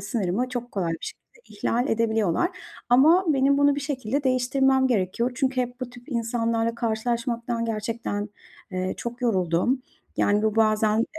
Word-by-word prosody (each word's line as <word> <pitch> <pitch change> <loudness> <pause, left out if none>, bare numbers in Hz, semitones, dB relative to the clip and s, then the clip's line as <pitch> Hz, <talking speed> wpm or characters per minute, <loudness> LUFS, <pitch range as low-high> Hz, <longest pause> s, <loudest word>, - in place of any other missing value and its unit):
sınırımı 210 +3 -1
çok 245 -1 -5
kolay 175 -4 -1
bir 165 - -4
şekilde - - -10 0.2
ihlal 245 - 0
edebiliyorlar 225 - +1 0.4
ama 310 +10 +6
benim 280 -1 +3
bunu 285 0 +4
bir 285 - -3
şekilde 275 -1 -2
değiştirmem 265 +1 +2
gerekiyor 235 +1 0
çünkü 260 -1 0
hep 245 +1 -4
bu 250 -1 -4
tip 245 +3 -15
insanlarla 230 -1 0
karşılaşmaktan 235 +1 -2
gerçekten, 220 -1 -3 0.4
eee, 185 0 -2
çok 240 +2 -6
yoruldum. 190 +4 +1 0.3
Yani, 205 +1 +2
bu 220 0 0
bazen 215 0 +3
235 Hz, 145 wpm, -25 LUFS, 220-255 Hz, 0.4 s, ama